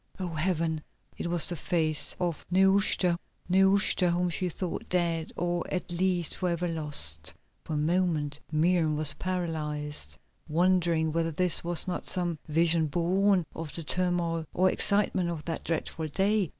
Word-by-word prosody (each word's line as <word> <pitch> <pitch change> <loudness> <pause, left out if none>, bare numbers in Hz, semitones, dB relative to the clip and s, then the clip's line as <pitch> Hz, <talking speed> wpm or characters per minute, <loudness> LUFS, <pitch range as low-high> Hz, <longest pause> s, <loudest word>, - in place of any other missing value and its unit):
Oh, 185 -2 -3
Heaven! 160 -1 -1 0.3
it - - -5
was 175 -2 +3
the 180 - +3
face 160 -3 +1
of 175 -4 -2
Nehushta, 190 -1 +3 0.3
Nehushta 190 0 +4
whom 175 +1 0
she 180 +2 -1
thought 175 +1 -5
dead, 170 -3 -1
or 175 0 -2
at 180 -1 -3
least 175 -1 0
for 180 - -1
ever 175 +1 -2
lost. 145 - -1 0.3
For 155 - -5
a - - -1
moment 155 -2 -1
Miriam 160 0 +1
was 150 -1 +5
paralysed, 155 -5 -3 0.3
wondering 170 -1 +1
whether 165 +1 -1
this 175 +2 +1
was 175 +2 +3
not 180 - -4
some 175 -3 -1
vision 165 +1 +2
born 180 +4 +1
of 160 -2 -6
the 165 - -3
turmoil 170 -1 0
and 185 +1 +3
excitement 200 -4 +3
of 165 -3 -6
that 165 -1 -4
dreadful 160 -1 -3
day. 195 +3 0
170 Hz, 150 wpm, -28 LUFS, 160-180 Hz, 0.3 s, was